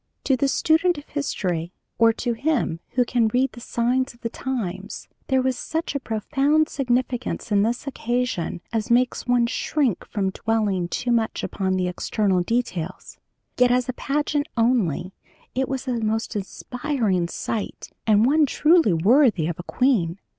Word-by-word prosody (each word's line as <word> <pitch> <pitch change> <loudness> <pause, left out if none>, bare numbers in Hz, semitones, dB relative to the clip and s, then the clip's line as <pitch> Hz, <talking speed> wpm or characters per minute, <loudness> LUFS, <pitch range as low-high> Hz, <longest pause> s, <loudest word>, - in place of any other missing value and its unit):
"To 270 - +3
the 275 +2 +1
student 320 +4 +2
of 290 - -10
history, 180 - -2 0.3
or 230 0 +6
to 235 +1 -2
him 240 - 0
who 250 -1 +3
can 235 -2 +2
read 250 +4 +1
the - - -11
signs 245 +3 0
of 235 - -25
the 230 - -3
times, 210 -7 -4 0.2
there 265 -1 +2
was 260 0 +1
such 325 -1 -3
a 280 - -1
profound 280 +7 +1
significance 250 -3 -1
in 200 -1 +4
this 235 +5 -1
occasion 240 - -2
as 225 0 -1
makes 245 +2 +2
one 245 -1 +3
shrink 255 - 0
from 195 -2 -1
dwelling 210 -4 0
too 240 +7 -2
much 230 -2 0
upon 190 -1 -1
the 185 -1 0
external 185 +1 0
details. 185 -5 -3 0.4
Yet 250 0 +6
as 250 0 +2
a 255 - -2
pageant 290 +2 -1
only 195 - +1 0.4
it 265 0 -1
was 265 0 -3
a 245 -2 0
most 220 +1 -1
inspiring 210 - -1
sight, 215 +4 -4 0.2
and 215 0 +5
one 300 +3 +4
truly 315 - +4
worthy 210 - +4
of 170 0 -3
a 175 - -8
queen. 205 -10 +2
240 Hz, 160 wpm, -23 LUFS, 200-265 Hz, 0.4 s, or